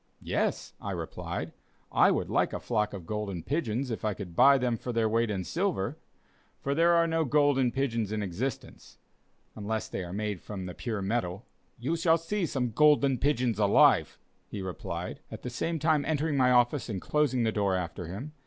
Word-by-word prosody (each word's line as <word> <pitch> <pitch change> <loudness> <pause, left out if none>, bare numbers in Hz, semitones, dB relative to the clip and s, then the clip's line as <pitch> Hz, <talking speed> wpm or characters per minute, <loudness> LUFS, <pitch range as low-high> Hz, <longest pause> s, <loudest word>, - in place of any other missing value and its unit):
"Yes," - - -1
I - - -4
replied, - - -5 0.4
"I - - +5
would - - 0
like - - +1
a - - -3
flock 105 0 0
of 95 -4 -8
golden 100 -4 -4
pigeons, 130 - -1
if 115 - -4
I 105 -2 0
could 90 -4 -8
buy 140 +7 +7
them 125 -2 0
for 125 - -5
their 115 -1 +1
weight 115 +1 +1
in 95 -3 -2
silver; 160 - -2 0.6
for 140 - -1
there 170 +3 +4
are 170 0 +4
no 165 0 +1
'golden' 145 -3 +3
pigeons 115 -6 -1
in 110 -1 -1
existence, 105 +8 -5 0.6
unless 110 +1 -3
they 95 - -4
are 85 - -7
made 105 -1 -3
from 95 -3 -6
the 90 - -6
pure 110 -3 -4
metal." 100 -1 -2 0.3
"You 135 +8 -1
shall 165 0 +3
see 170 +3 -2
some 125 -5 -1
golden 140 -1 +4
pigeons 125 -6 +1
alive," 100 -1 +4 0.3
he 100 -2 -6
replied, 95 -1 -5
at - - -9
the 125 - -4
same 165 +7 -2
time 155 -1 +2
entering 155 -1 0
my 130 -2 +4
office, 125 +2 +3
and 100 -4 -3
closing 135 0 +1
the 110 - +2
door 100 -3 +1
after 90 -1 -4
him. 115 - -7
120 Hz, 190 wpm, -29 LUFS, 105-145 Hz, 0.6 s, buy